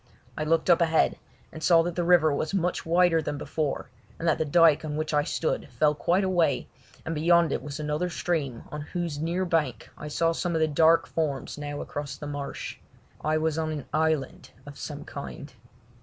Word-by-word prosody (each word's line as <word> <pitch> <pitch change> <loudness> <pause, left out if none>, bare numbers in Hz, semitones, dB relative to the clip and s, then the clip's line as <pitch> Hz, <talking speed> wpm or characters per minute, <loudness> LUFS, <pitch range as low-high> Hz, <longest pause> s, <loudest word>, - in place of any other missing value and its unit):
I 155 - -2
looked 165 +1 +2
up 170 - +5
ahead 160 -1 +2 0.3
and 160 - -9
saw 165 0 +5
that 175 0 -3
the 175 - 0
river 170 -3 +5
was 155 +7 -2
much 180 -2 -1
wider 170 -1 +4
than 145 -1 -3
before, 150 0 -3 0.3
and 170 - -3
that 160 - +2
the 160 - +1
dyke 160 0 +5
on 150 -1 -4
which 155 0 -2
I 145 0 +3
stood 160 0 -2
fell 150 -1 +2
quite 175 +6 +1
away, 180 -3 +1 0.4
and 160 - -2
beyond 170 +1 +3
it - - -1
was 145 0 -7
another 150 +4 -1
stream 150 -9 -2
on 150 - -5
whose 165 -1 -4
near 170 +4 -1
bank 150 -10 -1
I 150 - -8
saw 165 +2 +1
some 170 +1 -2
of - - +2
the 160 - +3
dark 160 +2 +4
forms 150 -5 -2
now 145 0 -5
across 140 -2 -5
the 150 - -8
marsh. 145 -1 -5 0.4
I 155 0 +2
was 160 0 0
on 160 -1 -1
an 150 -4 -5
island 155 -3 0 0.2
of 145 0 -10
some 145 0 -7
kind. 140 +1 -8
160 Hz, 200 wpm, -27 LUFS, 150-170 Hz, 0.4 s, up